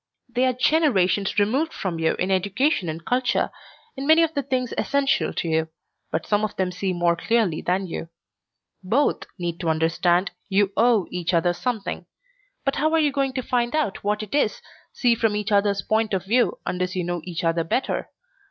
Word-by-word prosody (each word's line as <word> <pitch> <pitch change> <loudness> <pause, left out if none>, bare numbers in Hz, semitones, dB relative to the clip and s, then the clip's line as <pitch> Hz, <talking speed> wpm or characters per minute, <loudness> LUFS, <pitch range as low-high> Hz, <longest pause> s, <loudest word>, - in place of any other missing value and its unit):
"They 250 +2 +1
are 255 - +2
generations 235 - +2
removed 260 +11 +2
from 180 -5 -4
you 160 0 +1
in 185 +2 -1
education 195 - +1
and 160 +1 -6
culture, 250 0 +1 0.4
in 270 0 -5
many 320 +1 +6
of 325 -1 0
the 285 - 0
things 255 -3 -2
essential 280 -1 +1
to - - -2
you, 160 0 0 0.4
but 160 - -2
some 210 0 +1
of 215 - -2
them 185 -1 -1
see 185 +1 -2
more 175 -1 +2
clearly 210 -3 +1
than 185 +2 0
you. 165 -1 -6 0.7
Both 245 +10 +1
need 175 -2 -4
to 170 - -1
understand 175 +3 +2 0.2
you 200 0 +2
owe 230 -5 +3
each 180 0 -1
other 175 +1 +2
something. 225 +2 -3 0.6
And 275 - +1
how 310 +2 +1
are - - +4
you 300 -2 +3
going 275 -1 0
to 260 -1 -3
find 240 +2 0
out 300 -11 -1
what 210 +1 0
it 210 - -9
is, 290 - +1 0.3
see 245 -2 +2
from 225 -2 +1
each 210 +1 -2
other's 200 -1 +2
point 220 -2 +1
of 185 0 -3
view, 240 +5 +2
unless 180 +1 -2
you 180 - -1
know 175 0 -3
each 175 -2 -5
other 165 0 +1
better? 250 +11 -1
205 Hz, 195 wpm, -24 LUFS, 180-255 Hz, 0.7 s, many